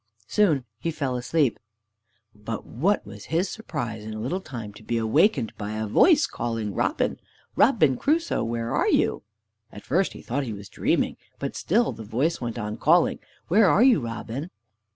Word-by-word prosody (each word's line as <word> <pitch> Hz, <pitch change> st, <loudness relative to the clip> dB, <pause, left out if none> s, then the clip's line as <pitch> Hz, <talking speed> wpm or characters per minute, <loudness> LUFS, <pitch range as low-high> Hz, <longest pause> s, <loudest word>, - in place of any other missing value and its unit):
Soon 155 Hz, -, +2 dB
he 170 Hz, -, -2 dB
fell 140 Hz, -5 st, -2 dB
asleep. 130 Hz, +1 st, +1 dB, 0.7 s
But 105 Hz, +2 st, -6 dB
what 185 Hz, -, 0 dB
was -, -, -10 dB
his 170 Hz, +4 st, 0 dB
surprise 120 Hz, -, -5 dB
in 110 Hz, 0 st, -6 dB
a -, -, -5 dB
little 160 Hz, -, -2 dB
time 115 Hz, -, -7 dB
to 105 Hz, -, -14 dB
be 115 Hz, +2 st, -2 dB
awakened 125 Hz, -, +2 dB
by 105 Hz, 0 st, -4 dB
a 110 Hz, 0 st, -2 dB
voice 300 Hz, -, +5 dB
calling, 115 Hz, -3 st, -3 dB
"Robin! -, -, 0 dB, 0.4 s
Robin 175 Hz, -, +4 dB
Crusoe! 325 Hz, +3 st, +1 dB
where 115 Hz, 0 st, -2 dB
are -, -, +2 dB
you?" -, -, +2 dB, 0.5 s
At 105 Hz, -, -11 dB
first 180 Hz, +7 st, +1 dB
he -, -, -11 dB
thought 140 Hz, +4 st, -2 dB
he 115 Hz, -4 st, -4 dB
was 100 Hz, -2 st, -9 dB
dreaming. -, -, 0 dB, 0.2 s
But -, -, -4 dB
still 230 Hz, +7 st, +1 dB
the 115 Hz, -, -8 dB
voice 130 Hz, +11 st, -1 dB
went 120 Hz, -1 st, -4 dB
on 105 Hz, -1 st, -4 dB
calling: 165 Hz, +7 st, +3 dB, 0.3 s
"Where 200 Hz, +2 st, +5 dB
are 215 Hz, -, +5 dB
you, 255 Hz, -4 st, +6 dB
Robin?" 120 Hz, +5 st, -5 dB
125 Hz, 175 wpm, -25 LUFS, 110-175 Hz, 0.7 s, you